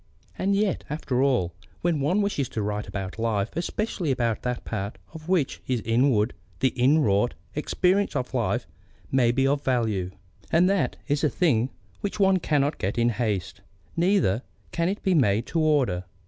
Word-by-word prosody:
And 195 +1 +1
yet, 200 -1 0
after 140 -4 -1
all, 125 -11 +2 0.3
when 170 -3 +1
one 180 +9 +2
wishes 145 - -1
to 110 - -3
write 105 0 -2
about 95 +1 -5
life, 110 -2 -1
especially 175 0 -2
about 120 -4 0
that 125 -1 -3
part 100 -2 -4 0.2
of 160 - -8
it 155 - -15
which 175 -7 +1
is 125 -2 +1
inward, 115 -1 +2 0.3
the 130 - +3
inwrought 125 -5 +3 0.2
experience 180 +5 +1
of 130 -1 -2
living 120 -3 0 0.5
may 130 -3 +4
be 135 +2 +1
of 140 +1 +1
value. 110 -8 0 0.4
And 170 +2 +5
that 195 0 +1
is 145 0 0
a 150 - +4
thing 130 -10 +2 0.3
which 205 +1 -4
one 190 -1 +4
cannot 145 -2 +1
get 95 +5 -2
in 120 0 +3
haste, 105 -5 -2 0.3
neither 170 - +2 0.3
can 170 +1 0
it 200 - -4
be 190 - +2
made 115 - +3
to 165 - -1
order. 135 - +2
135 Hz, 175 wpm, -26 LUFS, 115-170 Hz, 0.5 s, And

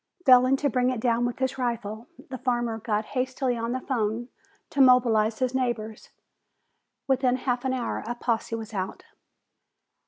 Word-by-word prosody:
Failing 255 0 +6
to 285 - 0
bring 250 -2 +1
it 255 -3 -2
down 235 0 +1
with 245 - -5
his 260 0 -2
rifle, 235 -2 -3 0.2
the 260 - -5
farmer 240 -3 -1
got 215 -1 -1
hastily 260 -1 -1
on 230 0 -3
the 255 - -1
phone 235 -1 -2 0.4
to 280 - +2
mobilize 230 -4 +4
his 255 -1 -1
neighbors. 235 -4 -3 1.0
Within 260 -2 +2
half 250 -1 -2
an 260 - +1
hour 250 -2 -3
a 240 - -3
posse 230 -1 -1
was 225 -1 -7
out. 190 -2 -4
245 Hz, 160 wpm, -26 LUFS, 225-255 Hz, 1.0 s, Failing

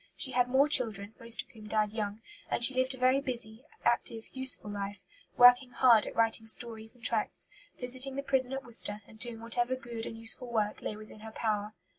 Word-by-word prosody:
She 265 - +2
had 245 -1 +2
more 270 +3 +4
children, 220 -8 +1
most 230 0 +1
of - - -33
whom 215 -1 -13
died 210 -1 0
young; 215 0 -4 0.3
and - - 0
she 265 - +5
lived 260 +1 0
a - - -14
very 255 +2 +3
busy, 240 -2 -4 0.2
active, 230 -1 0
useful 260 -5 +2
life, 200 0 -5 0.4
working 245 +1 +7
hard 240 -3 +4
at - - -7
writing 225 0 +1
stories 225 0 +1
and 240 - -23
tracts, 225 -2 +1 0.3
visiting 260 +2 -1
the 275 - -3
prison 265 -2 +1
at 270 0 -4
Worcester, 215 -3 +1
and 220 - -16
doing 230 -1 -5
whatever 240 +2 -1
good 235 -3 -7
and 225 - -7
useful 230 +2 -4
work 215 -2 -1
lay 215 - -4
within 215 0 -12
her 220 +1 -9
power. 215 -1 -2
230 Hz, 205 wpm, -30 LUFS, 220-255 Hz, 0.4 s, working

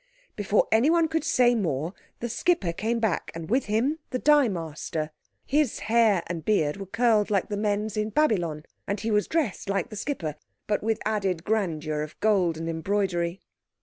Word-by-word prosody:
Before 205 0 +2
anyone 320 +9 +4
could 320 0 -1
say 245 -4 +4
more 165 - -1 0.3
the 240 - -1
skipper 230 - +1
came 225 +6 -1
back, 220 -6 0
and 165 +3 -6
with 260 +3 +2
him 240 +9 0
the 255 - -1
dye 295 0 +5
master. 160 -4 -4 0.3
His 290 -3 +1
hair 220 -5 +3
and 170 -2 -5
beard 155 -6 +1
were 195 -1 -7
curled 220 0 +2
like 200 -2 +1
the 205 - -2
men's 210 0 -1
in 215 0 -1
Babylon, 180 - +1 0.2
and 200 0 -1
he 225 +2 -2
was 210 -1 +2
dressed 290 - -1
like 195 -3 0
the - - -6
skipper, 170 - -3 0.3
but 210 - 0
with 220 0 0
added 195 -6 0
grandeur 160 -8 -1
of 155 +1 -7
gold 190 -6 +2
and 165 +1 -4
embroidery. 175 +1 -1
205 Hz, 180 wpm, -26 LUFS, 170-230 Hz, 0.3 s, dye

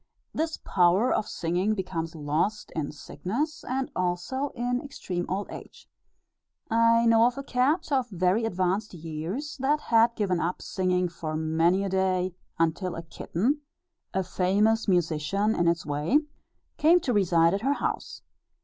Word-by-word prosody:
This 320 0 -1
power 185 +7 +3
of - - 0
singing 180 +6 0
becomes 165 -4 -4
lost 160 +8 -1
in 155 -3 -2
sickness, 275 - -4
and 260 +1 -2
also 180 +11 -1
in 245 +1 -1
extreme 185 -11 -5
old 195 +2 -2
age. - - -11 0.8
I 230 +1 +4
know 230 0 +6
of 245 - -3
a 275 - -4
cat, 275 +6 +1
of 260 -3 +1
very 185 +3 +1
advanced 190 0 -1
years, 170 - -5
that 285 +3 +2
had 230 -3 +3
given 185 -4 0
up 175 +2 -1
singing 180 -1 0
for 165 -2 -5
many 165 +4 +2
a 200 - -2
day, 185 -1 +1 0.2
until 165 +2 0
a 165 - -6
kitten 225 - -1 0.5
a 190 - 0
famous 205 +5 +1
musician 180 +3 +1
in 170 -5 +1
its 170 -1 +1
way 150 - +2 0.6
came 335 +4 +5
to 250 - 0
reside 170 -5 +4
at 200 - -1
her 275 +4 +2
house. - - -4
190 Hz, 150 wpm, -27 LUFS, 170-235 Hz, 0.8 s, know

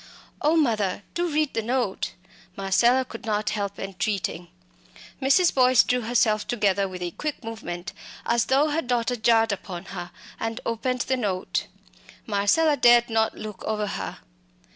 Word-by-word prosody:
"Oh, 305 +3 +3
mother! 215 - +1
do 350 0 0
read 300 -1 0
the 225 - 0
note!" 235 -3 -1 0.4
Marcella 235 +7 +3
could - - -10
not 215 -2 -1
help 200 -1 -3
entreating. 195 -2 -3 0.7
Mrs. 330 +7 +4
Boyce 255 -2 +5
drew 250 0 0
herself 220 -2 +1
together 200 -5 +1
with 180 -1 -6
a 175 - -3
quick 300 - -5
movement 180 -6 -6 0.3
as 235 0 +2
though 280 +4 +3
her 320 +2 +1
daughter 245 -1 0
jarred 225 -1 +3
upon 190 -2 -5
her, 175 -2 -6 0.3
and 225 0 -3
opened 245 +2 -1
the 260 - 0
note. 195 -6 -2 0.6
Marcella 220 +10 +2
dared 240 -2 +5
not 220 0 +1
look 215 -2 -8
over 215 -1 -1
her. 200 - -5
225 Hz, 150 wpm, -25 LUFS, 200-250 Hz, 0.7 s, Boyce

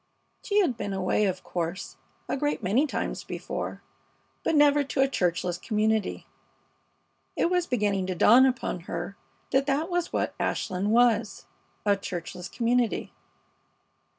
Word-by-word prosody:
She 415 -1 +2
had 260 - 0
been 205 -2 -3
away, 190 +2 +1
of 185 -2 -2
course, 170 +2 -4 0.3
a - - -1
great 290 -3 -1
many 230 +11 +2
times - - -3
before, - - -5 0.6
but 325 - +1
never 290 0 +5
to 275 0 -1
a 270 - +5
churchless 180 -6 -1
community. 215 +1 0 1.1
It 340 - +1
was 360 -1 +1
beginning 205 -6 0
to 185 - -2
dawn 245 +9 +7
upon 250 -7 -2
her 175 +4 -4 0.4
that 270 +1 +2
that 300 +6 0
was 350 -1 -1
what - - -1
Ashland 185 +2 -1
was 230 -3 +2 0.4
a 205 -1 +4
churchless 180 -2 -6
community. 240 -1 0
220 Hz, 140 wpm, -27 LUFS, 190-275 Hz, 1.1 s, dawn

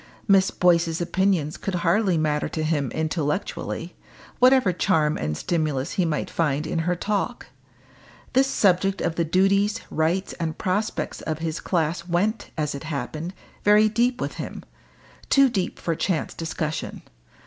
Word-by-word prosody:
Miss 195 -2 +5
Boyce's 170 -2 +2
opinions 175 -3 0
could 195 - -3
hardly 180 +2 +2
matter 150 -1 0
to 155 - -3
him 150 -4 0
intellectually, 160 +2 -2 0.5
whatever 255 -6 +5
charm 160 -4 +2
and 75 0 -2
stimulus 155 - -1
he 185 -4 +1
might 155 -2 -1
find 150 -2 0
in 160 - -2
her 180 - +2
talk. 210 +6 -2 0.9
This 265 +1 +4
subject 195 -5 +2
of 165 - 0
the 170 - 0
duties, 195 +5 +2
rights, 165 +5 0
and 160 -2 -2
prospects 205 +4 -2
of 155 -1 -3
his 160 0 -3
class 170 0 -1
went, 195 +6 0
as 150 -1 -1
it 140 +2 -7
happened, 155 +4 -4 0.3
very 210 +1 +6
deep 240 +3 +1
with - - -4
him - - -7 0.7
too 275 -1 +6
deep 195 -7 -2
for 165 - -2
chance 165 -1 -1
discussion. 160 -1 -4
170 Hz, 150 wpm, -24 LUFS, 155-195 Hz, 0.9 s, very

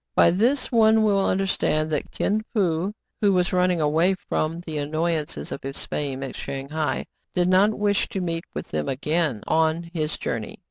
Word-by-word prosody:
By 170 - +6
this 240 +11 +1
one 220 -2 +5
will 200 -2 +3
understand 185 -5 +1
that 150 - -1
Kin 215 +2 0
Fo, 180 -2 +1 0.3
who 205 -2 +4
was 180 0 +1
running 180 -1 +2
away 160 +5 +3
from 165 -2 -2
the 160 -3 -4
annoyances 155 +1 -2
of - - -5
his 135 +1 -5
fame 135 -2 -3
at 135 - -6
Shang 135 0 -5
hai, 155 -1 -1 0.3
did 180 -1 +3
not 195 +4 +4
wish 205 -1 +1
to 200 - -3
meet 170 -1 -2
with - - -5
them 75 -1 -2
again 150 -3 0
on 160 +1 +1
his 155 -2 -1
journey. - - -4
170 Hz, 180 wpm, -24 LUFS, 155-195 Hz, 0.3 s, By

